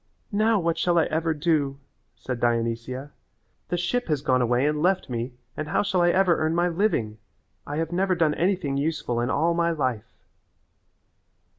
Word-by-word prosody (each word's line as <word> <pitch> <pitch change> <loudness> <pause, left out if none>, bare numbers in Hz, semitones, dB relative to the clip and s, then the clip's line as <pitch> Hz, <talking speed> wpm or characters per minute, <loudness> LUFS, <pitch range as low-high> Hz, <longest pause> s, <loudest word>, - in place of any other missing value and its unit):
"Now 215 +1 +3
what 170 -2 -1
shall 175 -1 +2
I 165 - +4
ever 160 +1 0
do?" 145 -3 0 0.4
said 125 -2 -5
Dionysia. 120 +3 -1 0.6
"The 175 - 0
ship 210 +9 -1
has 150 -4 -1
gone 130 -3 +2
away 120 +2 +2
and 150 0 0
left 185 -5 +1
me 120 +1 -3 0.2
and 155 - -4
how 185 +6 +1
shall 185 -3 +1
I 175 - +4
ever 185 -2 +3
earn 155 +1 0
my 175 +1 +2
living? 165 - 0 0.5
I 145 - -4
have 165 0 -2
never 185 +1 +1
done 160 -3 +2
anything 170 -5 0
useful 140 -5 -1
in 120 - -1
all 165 +5 +2
my 170 0 +1
life." 130 -9 -2
155 Hz, 175 wpm, -25 LUFS, 130-175 Hz, 0.6 s, I